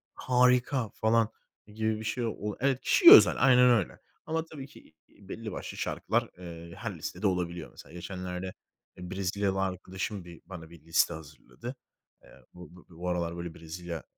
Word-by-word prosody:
harika." 125 -1 +2
falan 110 +1 +2 0.5
gibi 110 0 -1
bir - - -7
şey 120 +3 -1
ol 105 -2 -4
evet, 135 0 +1
kişiye 350 -2 +7
özel, 420 - +8
aynen 125 -1 +6
öyle 110 -6 0 0.3
ama 160 0 -1
tabii 145 -4 -9
ki, 80 - -18
iii, 100 -2 -20
belli 110 0 -6
başlı - - -7
şarkılar, - - -1
eee, 85 -1 -9
her - - -6
listede 105 - -3
olabiliyor 90 -3 -2
mesela. - - -14
Geçenlerde, 90 +1 -6 0.4
eee, 90 0 -8
Brezilyalı 95 +1 -1
arkadaşım 95 +1 -4
bir 85 -2 -12
bana 85 -4 -10
bir 85 - -14
liste 85 +1 +2
hazırladı. 75 - -10 0.5
Eee, - - -18 0.2
bu 90 0 -13
bu 90 - -16
bu 90 +1 -3
aralar 85 -1 -2
böyle 85 -1 -6
Brezilyaca, 85 0 -7
95 Hz, 165 wpm, -29 LUFS, 85-115 Hz, 0.5 s, özel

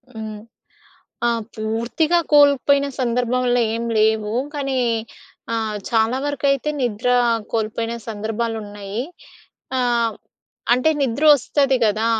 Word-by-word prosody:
హ్మ్. 215 -1 -6 0.9
ఆ! - - +3 0.3
పూర్తిగా 235 +10 0
కోల్పోయిన 280 -1 +5
సందర్భంలో 245 0 +1
ఏం 230 - -3
లేవు. 215 -1 +2 0.2
కానీ 275 -2 -2 0.8
ఆహ్, 220 -2 -2
చాలా 225 +2 +2
వరకైతే 280 0 0
నిద్ర 235 0 -1 0.4
కోల్పోయిన 225 +1 -2
సందర్భాలున్నాయి. 215 -1 -4 0.8
ఆహ్, 235 -2 +1 0.6
అంటే 255 +6 +3
నిద్ర 275 +2 0
వస్తది 275 0 +1
కదా 215 +1 +1
235 Hz, 95 wpm, -21 LUFS, 220-270 Hz, 0.9 s, కోల్పోయిన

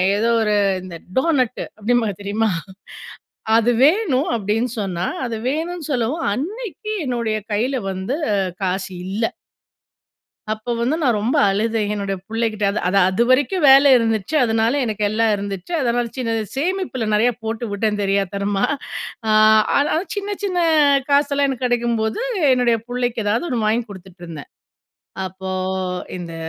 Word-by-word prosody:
ஏதோ 225 +3 +1
ஒரு 210 -1 +1 0.3
இந்த 180 -2 -8 0.2
டோனட் 260 -4 +1 0.2
அப்படிம்பாங்க 220 -1 0
தெரியுமா? 215 +2 0 1.1
"அது 235 +2 +3
வேணும்" 310 - +2
அப்படின்னு 220 +3 -1
சொன்னா, 185 -3 -2 0.2
அது 230 -1 -4
வேணும்ன்னு 320 +2 -3
சொல்லவும், 260 +5 -1
அன்னைக்கு 425 - -5
என்னுடைய 235 -4 -1
கைல 250 +5 0
வந்து 190 +9 -3 0.5
காசு 190 +1 -2 0.2
இல்ல 200 +4 -2 1.3
அப்போ 215 +2 -5
வந்து 255 +7 +1
நான் 245 -6 +3
ரொம்ப 220 +5 0
அழுதேன், 215 +1 0
என்னுடைய 200 -1 -3
புள்ளகிட்ட. 225 -2 -1
அது 200 - -2
அது 200 +2 +3
அதுவரைக்கும் 255 - +2
வேல 275 +1 +7
இருந்துச்சு. 225 +2 0
அதனால 225 0 +1
எனக்கு 215 -2 -2
எல்லாம் 220 +1 +2
இருந்துச்சு. 200 - -6
அதனால 240 -1 +1
சின்ன 240 -3 -2 0.2
சேமிப்பில 330 - -1
நெறைய 225 +4 +4
போட்டு 225 +1 -3
விட்டேன் 210 0 -1
தெரியாத்தனமா. 200 0 0 0.6
அ - - +1 0.5
ஆனாலும் 315 +4 +1
சின்ன 405 0 -3
சின்ன 370 -3 -1 0.5
காசெல்லாம் 280 0 +3
எனக்கு 260 -2 -1
கெடைக்கும்போது 235 - 0 0.3
என்னுடைய 245 -2 +3
பிள்ளைக்கு 245 -2 -1
எதாவது 225 +11 +1
ஒண்ணு 235 -6 0
வாங்கி 225 +3 +1
குடுத்துட்டுருந்தேன். 175 -5 -10 0.8
அப்போ 190 +1 -6 0.7
இந்த 170 -2 -7
230 Hz, 130 wpm, -20 LUFS, 205-265 Hz, 1.3 s, வேல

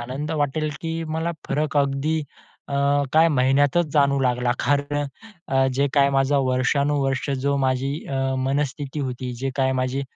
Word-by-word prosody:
आनंद 135 +6 -5
वाटेल, 150 +2 0
की 165 -1 -3
मला 160 +2 -2 0.2
फरक 150 0 -1
अगदी 140 +3 +1 0.5
अ, 140 - -3 0.4
काही 160 +1 +5
महिन्यातचं 140 +3 +3
जाणवू 140 -2 +3
लागला 125 -1 +1
कारण 145 0 0
अ, 145 - -1 0.5
अ, 135 0 +4
जे 140 - +3
काही 140 -1 +5
माझा 135 +1 +3
वर्षानुवर्ष 135 +2 +1
जो 140 0 +1
माझी 130 +1 0
अ, 135 -1 -1
मनस्थिती 140 +1 -2
होती. 125 -2 -4
जे 135 - -1
काही 130 -1 +2
माझी 130 +2 -1
140 Hz, 155 wpm, -23 LUFS, 135-145 Hz, 0.5 s, काही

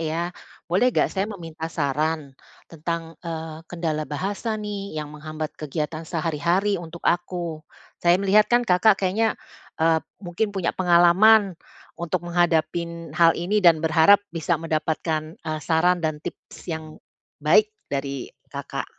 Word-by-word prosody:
ya. 165 +2 -2 0.4
Boleh 190 +9 +3
nggak - - +2
saya 195 +1 -1
meminta 165 -5 -6
saran. 150 0 -1 0.4
Tentang, 165 0 -5
eee, 160 -1 -5
kendala 160 -3 -2
bahasa 200 - -3
nih 205 -4 -5
yang 150 -1 -4
menghambat 155 0 -6
kegiatan 155 +2 -4
sehari-hari 170 +5 0
untuk 170 0 -10
aku. 175 -2 -1 0.4
Saya 175 0 +5
melihat 200 +2 +4
kan 240 0 +3
Kakak 195 +1 +4
kayaknya, 210 +4 +1 0.4
eee, 160 0 +4 0.2
mungkin 200 +3 -2
punya 190 -4 -1
pengalaman, 185 +3 +5 0.4
untuk 175 0 -3
menghadapin 170 -1 0
hal 165 -1 +6
ini 190 +5 -1
dan 165 -2 +6
berharap 160 +5 +5
bisa 165 -1 -1
mendapatkan, 155 0 -2
eee, 155 -1 -4
saran 175 +2 +3
dan 155 -1 -1
tips - - -10
yang 160 -2 -6 0.4
baik 430 0 +4 0.2
dari 140 -1 -3 0.2
Kakak. - - -4
170 Hz, 135 wpm, -24 LUFS, 160-185 Hz, 0.4 s, hal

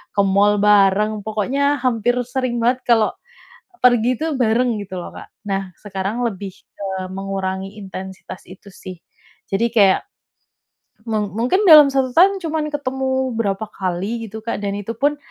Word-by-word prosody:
ke 200 - +4
mall 200 +1 +3
bareng, 210 +1 +4
pokoknya 275 +7 0
hampir 245 -1 +1
sering 255 -1 -2
banget 250 +2 +1
kalau 225 -3 +3 0.7
pergi 245 0 +4
tuh 315 -2 -1
bareng 235 -1 +1
gitu 190 -1 -9
loh, - - -8
Kak. - - -10 0.2
Nah, 195 -1 -2
sekarang 200 +3 -4
lebih 195 -3 -5 0.2
ke 200 - -6 0.3
mengurangi 195 0 -4
intensitas 190 -1 -9
itu 190 +2 -14
sih, 185 -1 -10 0.5
jadi 195 +4 +1
kayak 195 -4 +5 1.1
mung 210 -3 -2
mungkin 250 - +1
dalam 300 -3 +9
1 260 -2 +1
tahun 385 +3 +5
cuman 315 -1 -2
ketemu 265 -2 -2
berapa 205 -1 -1
kali 195 +6 -3
gitu, 220 - -6
Kak. 230 - -3
Dan 200 0 -2
itu 225 +3 -6
pun 290 +3 +1
220 Hz, 150 wpm, -20 LUFS, 195-255 Hz, 1.1 s, dalam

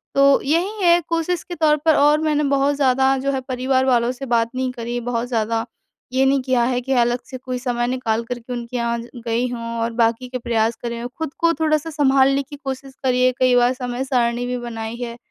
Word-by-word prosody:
तो 275 0 +5
यही 365 +8 0
है, 345 0 +6
कोशिश 335 +1 -1
के 350 - -7
तौर 305 -2 +3
पर 315 - +5
और 295 +1 +4
मैंने 300 -1 +1
बहुत 280 +1 +2
ज़्यादा 265 -1 +3
जो 275 +1 -1
है 265 -1 -2
परिवार 260 +1 +1
वालों 245 -1 +2
से 270 +2 -7
बात 235 -2 +1
नहीं 255 0 -1
करी, 240 0 -4
बहुत 240 0 -2
ज़्यादा 225 -1 -1 0.5
ये 265 +1 +3
नहीं 270 0 +3
किया 255 -2 +1
है 250 +1 +1
कि 265 +2 -2
अलग 240 +1 +1
से 260 - -6
कोई 255 0 -5
समय 240 -1 -1
निकाल 235 -3 -1
कर 245 +1 -5
के 245 +1 -8
उनके 240 0 -6
यहाँ 235 0 -1
ज 235 - -11 0.2
गई 235 +2 0
हूँ, 235 -1 -5 0.2
और 230 +1 -1
बाकी 230 +2 +1
के 255 - -3
प्रयास 230 -1 0
करे 235 -1 -3
हों। 240 - -4
खुद 320 -3 -4
को 335 -1 +3
थोड़ा-सा 310 0 +1
संभालने 275 -2 +3
की 290 +2 -11
कोशिश 270 0 -5
करी 250 -1 +2
है, 255 - +4
कई 255 -1 +4
बार 245 +1 +4
समय-सारणी 245 -1 -1
भी 250 - -2
बनाई 230 -2 -5
है 235 0 -6
255 Hz, 225 wpm, -21 LUFS, 240-275 Hz, 0.5 s, है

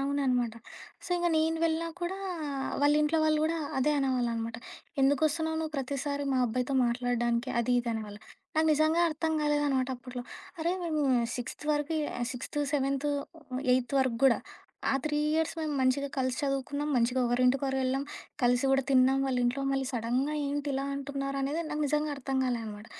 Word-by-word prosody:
అవుననమాట. 260 -4 +1 0.5
So - - -8
ఇంగా 345 0 +1
నేను 320 +1 +2
వెళ్ళినా 330 0 0
కూడా 360 +2 -2 0.6
వాళ్ళ 290 0 +5
ఇంట్లో 310 +2 +2
వాళ్ళు 310 0 +3
గూడా 330 +1 0 0.2
అదే 295 +3 +3
అనేవాళ్ళనమాట. 235 -4 0 0.4
"ఎందుకొస్తున్నావు 310 +4 +2
నువ్వు? 315 -1 -3
ప్రతిసారి 280 +1 -2
మా 260 - +2
అబ్బాయితో 250 +4 -1
మాట్లాడడానికి? 240 0 0
అది 245 +1 0
ఇది 240 - -5
అనేవాళ్ళు." 210 -2 -6 0.4
నాకు 315 - +4
నిజంగా 310 +2 +3
అర్థం 320 +1 -1
కాలేదనమాట 290 -3 +1
అప్పట్లో. 245 0 -7 0.4
అరే 335 +2 0
మేము 310 -3 0 0.3
సిక్స్త్ 245 +4 -6
వరకి 295 +2 0 0.2
ఆహ్, 240 - -1
సిక్స్త్, 260 +3 -5
సెవెన్త్, 275 0 0 0.7
ఏయిత్ 255 +1 -1
వరకు 250 -3 0
గూడా 255 -3 +6 0.5
ఆ - - +2
3 300 -1 0 0.2
ఇయర్స్ 320 0 +1
మేము 310 -1 -2
మంచిగా 260 +2 +2
కలిసి 260 -1 0
చదువుకున్నాం. 285 +1 -1
మంచిగా 245 +2 +2
ఒకరింటికొకరం 255 +2 +2
ఎళ్ళాం, 270 +2 0 0.4
కలిసి 245 +1 +3
కూడా 270 0 +3
తిన్నాం. 265 +1 +5
వాళ్ళ 260 -2 0
ఇంట్లో 250 +3 0
మళ్ళీ 270 -1 0
సడెన్‌గా 245 +6 0
ఏంటి 290 0 -2
ఇలా 270 +1 -1
అంటున్నారనేది 275 +2 -2
నాకు 300 0 -1
నిజంగా 300 +1 0
అర్థం 270 0 -2
కాలే 245 -2 0
అనమాట. 210 +1 -8
275 Hz, 160 wpm, -30 LUFS, 250-300 Hz, 0.7 s, గూడా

